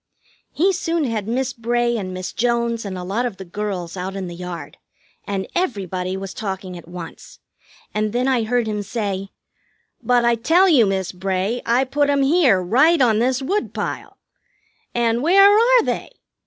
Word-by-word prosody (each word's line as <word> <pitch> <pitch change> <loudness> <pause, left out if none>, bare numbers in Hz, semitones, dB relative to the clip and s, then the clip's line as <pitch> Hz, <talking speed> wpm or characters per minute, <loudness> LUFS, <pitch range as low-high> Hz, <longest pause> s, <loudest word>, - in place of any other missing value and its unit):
He 380 +5 +2
soon 335 -2 -1
had 220 -6 -2
Miss 255 +2 -1
Bray 240 +1 0
and 190 -5 -4
Miss 185 0 -5
Jones 235 -1 0
and 190 -2 -5
a 180 - -5
lot 200 +7 -1
of 235 -6 -3
the 190 - -8
girls 185 -2 -4
out 190 +1 -5
in 195 -1 -4
the 175 - -7
yard, 180 0 -7 0.5
and 195 -1 -3
everybody 190 - -2
was 195 0 -6
talking 190 -3 -5
at 170 -2 -11
once; 175 -1 -10 0.6
and 215 0 -1
then 245 +3 0
I 260 -3 +2
heard 235 +1 0
him 210 -1 -2
say: 200 -2 -3 0.7
"But 245 -1 +2
I 235 - +4
tell 325 - +3
you, 265 - +5
Miss 190 -2 -1
Bray, 190 +5 -2
I 240 +3 +3
put 285 +2 0
'em 280 -1 +2
here, 275 - +4
right 275 - +4
on 225 -5 +3
this 255 +3 +1
woodpile. 400 +10 -3 0.8
And 235 0 +1
where 390 +6 +6
are 475 +2 +5
they? - - -3
230 Hz, 175 wpm, -21 LUFS, 190-260 Hz, 0.8 s, where